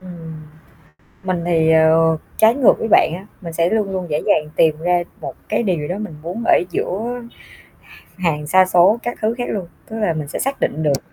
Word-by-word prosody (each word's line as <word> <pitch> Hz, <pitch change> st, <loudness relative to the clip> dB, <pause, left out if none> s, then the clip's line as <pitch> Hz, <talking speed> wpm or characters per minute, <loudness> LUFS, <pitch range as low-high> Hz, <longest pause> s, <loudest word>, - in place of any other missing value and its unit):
Ừm. 165 Hz, -4 st, -10 dB, 0.8 s
Mình 185 Hz, -2 st, -2 dB
thì, 160 Hz, -2 st, +2 dB
ờ, 160 Hz, 0 st, +4 dB, 0.2 s
trái 220 Hz, +3 st, +5 dB
ngược 270 Hz, -4 st, +5 dB
với 225 Hz, -, -2 dB
bạn 205 Hz, -, +4 dB
á, 190 Hz, +2 st, -10 dB, 0.2 s
mình 170 Hz, -3 st, -7 dB
sẽ 170 Hz, +1 st, +1 dB
luôn 215 Hz, -3 st, 0 dB
luôn 185 Hz, -2 st, -3 dB
dễ 150 Hz, 0 st, -1 dB
dàng 150 Hz, 0 st, +2 dB
tìm 155 Hz, -2 st, +3 dB
ra 175 Hz, +1 st, +1 dB, 0.2 s
một -, -, -6 dB, 0.2 s
cái 215 Hz, +2 st, 0 dB
điều 170 Hz, -8 st, -1 dB
đó 180 Hz, -, -3 dB
mình 210 Hz, -5 st, -6 dB
muốn 180 Hz, +8 st, -5 dB
ở -, -, +6 dB, 0.2 s
giữa 240 Hz, +6 st, -3 dB, 1.0 s
h -, -, -17 dB
hàng 150 Hz, -4 st, -1 dB
sa 185 Hz, +5 st, +5 dB
số 185 Hz, +4 st, +4 dB
các 240 Hz, -, -4 dB
thứ 220 Hz, +2 st, +1 dB
khác 245 Hz, -, -1 dB
luôn. 195 Hz, -4 st, -3 dB, 0.2 s
Tức 225 Hz, -, -6 dB
là 210 Hz, -6 st, +1 dB
mình 155 Hz, -3 st, -5 dB
sẽ -, -, -5 dB
xác 275 Hz, +1 st, -2 dB
định 155 Hz, -, -1 dB
được, 145 Hz, -3 st, -1 dB
175 Hz, 215 wpm, -19 LUFS, 160-210 Hz, 1.0 s, ở